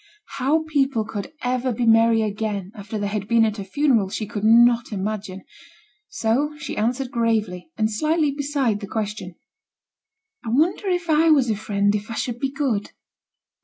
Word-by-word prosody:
How 290 +5 +1
people 270 -7 +1
could 210 +3 -6
ever 250 +1 0
be 235 +1 -1
merry 225 0 +4
again 205 -2 -3
after 210 -1 -6
they 205 - -2
had 205 -1 -3
been 230 -1 +4
at 215 -1 -2
a - - -4
funeral, 230 -2 +1
she 215 - -3
could 210 -1 -6
not 235 +1 +5
imagine; 195 -1 -4 0.6
so 285 - -1
she 300 - -6
answered 245 +4 -1
gravely, 220 - -1
and 220 0 +1
slightly 305 +6 +1
beside 275 -6 -1
the 200 - -7
question: 205 -4 -4 1.1
'I 230 - -5
wonder 335 +9 +1
if 355 -1 -1
I 320 +1 +4
was 270 -7 +4
a - - 0
Friend 205 0 0
if 210 +1 -3
I 230 - -5
should 240 0 -3
be 270 - -1
good?' 270 -8 -2
225 Hz, 170 wpm, -22 LUFS, 210-270 Hz, 1.1 s, not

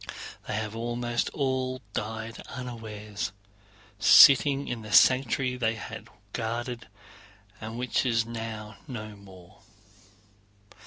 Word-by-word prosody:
They - - -2
have 110 0 -3
almost 120 +1 -2
all 130 -2 -1
died 110 +1 -4
unawares, 110 -5 -6 0.7
sitting 140 +5 +7
in 120 -2 -4
the 110 -1 -9
sanctuary 130 0 +4
they 115 -2 0
had 110 0 -8 0.3
guarded 120 +1 -4 0.7
and 110 +1 -6
which 125 0 0
is 115 -3 +1
now 110 -2 -6
no 110 -5 -7
more. 95 -3 -16
115 Hz, 105 wpm, -28 LUFS, 110-125 Hz, 0.7 s, sitting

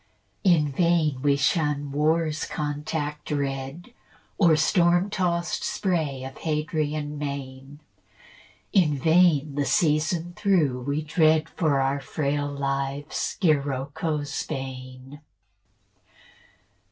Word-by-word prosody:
In 155 -6 +3
vain 160 -4 +1
we 140 0 +3
shun 145 0 0
war's 155 +1 +1
contact 150 0 -4
red 140 - -4 0.5
Or 170 -5 +6
storm 175 +4 +3
tost 170 -4 -1
spray 155 -9 -1
of 130 0 -8
Hadrian 150 -1 -2
main: 140 0 -6 0.9
In 155 -8 +3
vain, 160 -1 +3
the 145 0 -1
season 160 +3 +1
through, 155 -11 +1
we 145 +2 -1
dread 155 0 +3
For 150 -5 +1
our 135 +1 +1
frail 145 +1 -2
lives 140 +1 -3
Scirocco's 145 -1 -1
bane. 130 0 -7
150 Hz, 95 wpm, -25 LUFS, 140-160 Hz, 0.9 s, Or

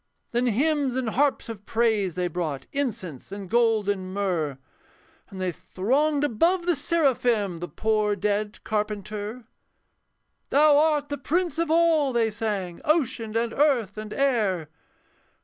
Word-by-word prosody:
Then 240 +1 +1
hymns 275 +2 +1
and 255 -4 -1
harps 285 +3 +1
of 220 -3 -8
praise 220 -6 +1
they 180 -1 0
brought, 155 -6 -3
Incense 215 - -4
and 200 -1 -6
gold 225 -1 +2
and 190 -2 -2
myrrh, 175 -8 -1 0.7
And 190 - -9
they 185 -1 -1
thronged 280 - 0
above 335 - +2
the 350 -1 +2
seraphim, 245 - +1
The 175 - -5
poor 210 +5 0
dead 205 +1 -2
carpenter. 210 +2 -3 1.1
'Thou 295 +1 +5
art 295 -1 +2
the 285 -1 -4
prince 330 +3 -1
of 335 -2 0
all,' 320 -4 +3
they 230 -2 +2
sang, 205 -5 -3
'Ocean 235 -8 0
and 230 0 -1
earth 260 - +2
and 215 0 -7
air.' 215 - 0
225 Hz, 140 wpm, -25 LUFS, 200-285 Hz, 1.1 s, Thou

